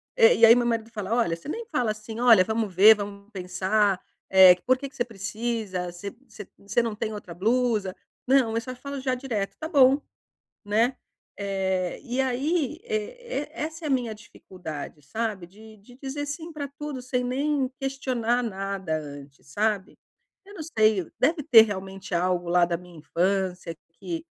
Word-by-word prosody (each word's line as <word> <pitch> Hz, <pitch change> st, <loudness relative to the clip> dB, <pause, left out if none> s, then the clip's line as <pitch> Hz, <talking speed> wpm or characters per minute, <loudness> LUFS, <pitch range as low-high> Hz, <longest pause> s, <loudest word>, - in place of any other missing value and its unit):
Eh, 475 Hz, 0 st, +6 dB
e -, -, +8 dB
aí 230 Hz, +1 st, +8 dB
meu 245 Hz, -, +1 dB
marido 230 Hz, -1 st, -1 dB
fala: 210 Hz, -2 st, -4 dB
"Olha, 230 Hz, -9 st, +1 dB
você 170 Hz, -, -11 dB
nem 460 Hz, +7 st, -4 dB
fala 250 Hz, -, 0 dB
assim 215 Hz, +1 st, -8 dB
olha 230 Hz, -6 st, +7 dB
vamos 220 Hz, -2 st, -2 dB
ver 210 Hz, +5 st, +8 dB
vamos 200 Hz, 0 st, -8 dB
pensar, 190 Hz, +1 st, 0 dB, 0.3 s
eh. 190 Hz, -1 st, +9 dB
Por 255 Hz, +1 st, +4 dB
que 275 Hz, +2 st, -6 dB
que 265 Hz, -, -24 dB
você 240 Hz, -, 0 dB
precisa? 215 Hz, -4 st, -4 dB
Você 195 Hz, +3 st, -7 dB, 0.2 s
você 210 Hz, -3 st, -11 dB
você 200 Hz, +4 st, 0 dB
não 225 Hz, -2 st, -3 dB
tem 215 Hz, +1 st, -3 dB
outra 205 Hz, -4 st, -8 dB
blusa?" 215 Hz, -1 st, 0 dB, 0.3 s
Não, 255 Hz, -4 st, +3 dB
eu 230 Hz, -, 0 dB
só 255 Hz, +2 st, -7 dB
falo 280 Hz, +2 st, -6 dB
já 260 Hz, -1 st, 0 dB
direto, 235 Hz, -6 st, -3 dB
está 315 Hz, -, -6 dB
bom, 275 Hz, -3 st, +5 dB, 0.7 s
né. 230 Hz, +5 st, +2 dB, 0.4 s
Eh 190 Hz, -2 st, -2 dB
e 255 Hz, -1 st, -3 dB
aí, 280 Hz, +4 st, 0 dB
e 460 Hz, -2 st, -3 dB, 0.5 s
e -, -, -11 dB
essa 320 Hz, +1 st, -5 dB
é -, -, -1 dB
a -, -, -2 dB
minha 245 Hz, -5 st, 0 dB
dificuldade, 180 Hz, -8 st, -9 dB
sabe, 205 Hz, +3 st, -4 dB
de 215 Hz, +3 st, -15 dB
de 230 Hz, +5 st, -18 dB
dizer 285 Hz, +2 st, -3 dB
sim 320 Hz, +3 st, -6 dB
pra 290 Hz, -3 st, -5 dB
tudo, 285 Hz, -1 st, -7 dB
sem 250 Hz, 0 st, -2 dB
nem 270 Hz, +1 st, 0 dB
questionar 250 Hz, -3 st, -1 dB
nada 195 Hz, -5 st, -3 dB
antes, 145 Hz, -2 st, -10 dB
sabe. 205 Hz, +5 st, -1 dB, 0.5 s
Eu 405 Hz, -, -14 dB
não 320 Hz, -, -6 dB
sei, 215 Hz, -5 st, +3 dB
deve 300 Hz, +2 st, +2 dB
ter 230 Hz, -4 st, +9 dB
realmente 195 Hz, -2 st, -4 dB
algo 175 Hz, 0 st, 0 dB
lá 175 Hz, 0 st, +4 dB
da 170 Hz, 0 st, -1 dB
minha 180 Hz, -1 st, -14 dB
infância 180 Hz, +1 st, -1 dB, 0.2 s
que 330 Hz, -, -6 dB
220 Hz, 180 wpm, -26 LUFS, 190-255 Hz, 0.7 s, eh